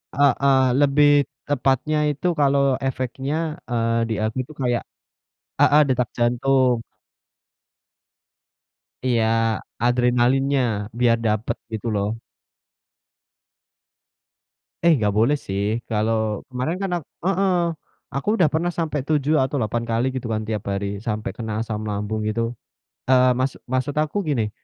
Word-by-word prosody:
Heeh 140 -1 +4 0.2
lebih 145 +1 +4 0.4
tepatnya 135 +2 +1
itu 145 +4 -2
kalau 140 -1 +3 0.2
efeknya, 135 +2 -2 0.3
eee, 115 -1 +1
di - - 0
aku 110 0 -2
itu 155 +5 -13
kayak 120 -2 0 0.8
heeh, 150 - +6
detak 125 -3 0
jantung. 125 +1 +2 2.3
Iya, 120 -3 +2 0.6
adrenalinnya. 125 +3 +2 0.4
Biar 120 -2 +4
dapat 110 +1 0 0.2
gitu 110 +1 -4
loh. 100 0 0 2.8
Eh, 170 - +7
enggak 110 -8 +1
boleh 115 +7 +4
sih 105 -3 -2
kalau 110 -1 0
kemarin 130 +8 -2
kan 195 -1 -3
aku - - -23 0.2
heeh. 195 0 +2 0.6
Aku 140 +5 -4
udah 175 - +5
pernah 170 +2 0
sampai 160 -4 -2
7 150 +1 +1
atau 130 +2 -1
8 115 +1 -1
kali 120 +3 0
gitu 125 -2 -4
kan 110 0 -2
tiap 110 -2 -3
hari. 100 0 -3
Sampai 105 -3 -3
kena 110 -2 -4
asam 110 -1 -3
lambung 105 +1 -3
gitu. 115 +2 -1 0.6
Eee, 130 -1 +5
maksud 130 +1 -2
maksud 130 +2 -1
aku 155 +6 0
gini, 115 -7 0
125 Hz, 125 wpm, -22 LUFS, 110-140 Hz, 2.8 s, Eh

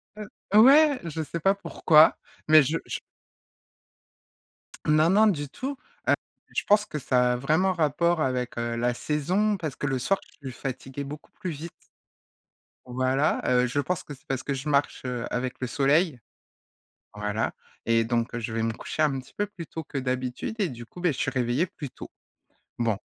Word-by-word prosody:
Heu, 210 -1 -7 0.4
ouais, 285 +1 +6
je 160 -1 -4
sais 165 +3 -5
pas 195 +4 +3
pourquoi 160 -5 +5 0.3
mais 155 -1 +8
je 155 +5 0
je - - -4 1.9
Non 155 +2 +4
non 215 +3 +6
du 145 -8 0
tout. 265 - -5 0.7
Heu, - - -21
je - - +1
pense 210 0 +4
que 150 - -5
ça 125 -3 +2
a - - -1
vraiment 155 +9 +2
rapport 170 +1 +1
avec, 125 -4 -1
heu, 115 0 -2
la 120 +1 0
saison 180 - 0
parce 155 -7 -5
que - - -3
le 135 -2 0
soir 195 +10 +1 0.2
je 140 - -6
suis 120 - -12
fatiguée 135 +1 -5
beaucoup 145 +2 -9
plus 185 - -6
vite 160 +2 -6 1.2
voilà. 130 +3 +1
Heu, 125 0 +3
je 125 +4 -1
pense 180 +5 -1
que 145 - -9
c'est 135 - -16
parce 130 -1 -2
que 140 - -2
je 135 +2 -5
marche, 140 0 +1
heu, 125 -2 -3
avec 125 +1 -2
le 130 - -1
soleil. 150 +1 +2 1.0
Voilà 105 +1 -2 0.3
et 115 0 +4
donc 115 +1 -1
je 120 -1 -4
vais 115 0 -1
me 115 - 0
coucher 155 - -3
un 145 -3 +2
petit 130 - -17
peu 205 - -1
plus 190 -4 -9
tôt 160 +2 -7
que 145 - -8
d'habitude 130 - -3
et 200 -4 +1
du 120 -4 -8
coup 175 - -12
beh, 175 -2 +2
je 130 - -9
suis - - 0
réveillé 130 +5 0
plus 165 -6 -8
tôt. - - -10 0.7
Bon. 115 -3 +1
140 Hz, 190 wpm, -26 LUFS, 125-170 Hz, 1.9 s, mais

